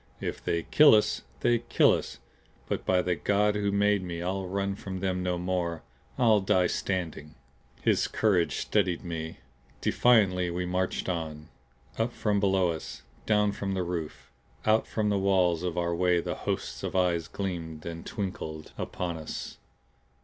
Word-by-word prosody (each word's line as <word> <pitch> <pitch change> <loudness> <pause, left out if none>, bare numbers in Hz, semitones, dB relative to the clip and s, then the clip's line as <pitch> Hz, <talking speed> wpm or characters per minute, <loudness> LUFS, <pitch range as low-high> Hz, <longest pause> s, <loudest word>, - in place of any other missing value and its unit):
If - - -4
they 85 -1 0
kill 150 -6 +7
us, 105 - +1 0.2
they 120 -1 +3
kill 120 - +4
us. - - -3 0.5
But - - -3
by 90 -1 +3
the 90 - +1
God 105 +4 +2
who 100 -1 0
made 100 0 +3
me 85 -2 -5
I'll 95 +2 -2
run 100 +1 -1
from 95 -1 -6
them 90 -1 -1
no 90 -1 -1
more. 90 -2 -2 0.3
I'll 115 -4 +5
die 95 -2 +2
standing." 85 -5 -3 0.5
His - - +3
courage 95 -6 +2
steadied 95 -4 0
me. 80 -2 -5 0.4
Defiantly 95 -7 +3
we 90 +1 -2
marched 90 +1 -1
on. 80 -3 -4 0.5
Up 115 +2 0
from 105 -2 0
below 95 -3 +2
us, 80 -1 -7 0.2
down 105 -1 +3
from 95 -1 -3
the 95 - 0
roof, 80 -7 -5 0.3
out 110 +1 +3
from 105 -1 0
the 100 -1 +1
walls 95 -4 +2
of 90 -1 -3
our 85 -1 0
way 90 0 +2
the - - -3 0.2
hosts - - -3
of - - -4
eyes 85 -3 +2
gleamed 85 -5 -5
and 85 -1 -6
twinkled 80 -7 -5
upon 85 -2 -3
us. 80 -1 -7
90 Hz, 165 wpm, -28 LUFS, 85-100 Hz, 0.5 s, kill